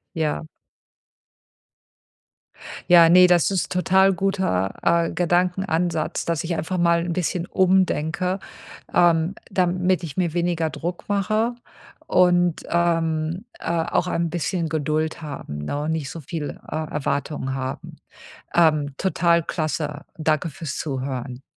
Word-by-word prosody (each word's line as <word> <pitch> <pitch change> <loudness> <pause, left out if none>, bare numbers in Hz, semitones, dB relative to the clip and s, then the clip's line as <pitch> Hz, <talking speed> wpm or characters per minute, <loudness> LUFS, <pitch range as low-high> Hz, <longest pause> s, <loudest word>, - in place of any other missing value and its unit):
Ja. 155 - -1 2.5
Ja, 170 -2 +8
ne, 180 +1 +8
das 175 +1 +3
ist 190 -3 -1
total 190 +1 +4
guter, 185 - 0
äh, 170 -1 +2
Gedankenansatz, 175 -1 0
dass 165 -2 -1
ich 170 0 -2
einfach 165 +4 -3
mal 170 -1 +3
'n 175 - -2
bisschen 175 0 -1
umdenke, 185 -1 +1 0.5
ähm, 170 +1 +3
damit 185 -1 +1
ich 150 -5 -7
mir 175 -4 0
weniger 170 -2 0
Druck 170 +4 -5
mache 215 +4 0 0.5
und, 175 -2 +3
ähm, 165 +1 0
äh, - - -10
auch 170 +1 0
ein 170 -1 -1
bisschen 170 0 -2
Geduld 155 +1 -1
haben, 140 - -6
ne, 145 - -3
nicht 160 -4 -2
so 165 - -7
viel, 150 +1 -5
äh, - - -5
Erwartungen 145 -3 -2
haben. 130 0 -5 0.6
Ähm, 155 -4 +3
total 170 -2 +2
klasse. 155 -2 -3 0.2
Danke 155 +1 0
für's 150 0 -6
Zuhören. 130 -3 -4
170 Hz, 120 wpm, -23 LUFS, 155-180 Hz, 2.5 s, Ja